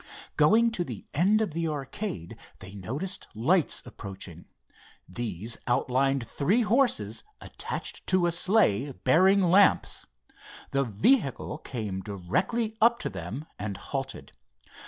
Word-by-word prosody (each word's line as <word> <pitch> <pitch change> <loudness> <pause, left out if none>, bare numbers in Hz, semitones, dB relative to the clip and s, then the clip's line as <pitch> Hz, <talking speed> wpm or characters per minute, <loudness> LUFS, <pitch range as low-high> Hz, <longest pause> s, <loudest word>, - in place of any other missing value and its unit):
Going 225 +10 +5
to 180 -6 -1
the 120 - -7
end 200 +8 +3
of 215 - -1
the 165 0 -1
arcade, 140 - -4 0.2
they 95 +1 -11
noticed 140 - -4
lights 160 - +2
approaching. 95 -7 -9 0.6
These 110 +1 -3
outlined 130 +1 +1
three 185 - +1
horses 250 +4 +1 0.2
attached - - -5
to 185 -2 +3
a 175 - +2
sleigh 170 - +2
bearing 190 +10 +4
lamps. 185 +3 +3 0.6
The 140 0 +2
vehicle 135 - +1
came 105 -10 -4
directly 180 - -1
up 235 +1 +5
to - - -2
them 140 +6 -6
and 100 -2 -4
halted. 135 +4 -5
140 Hz, 120 wpm, -28 LUFS, -, 0.6 s, Going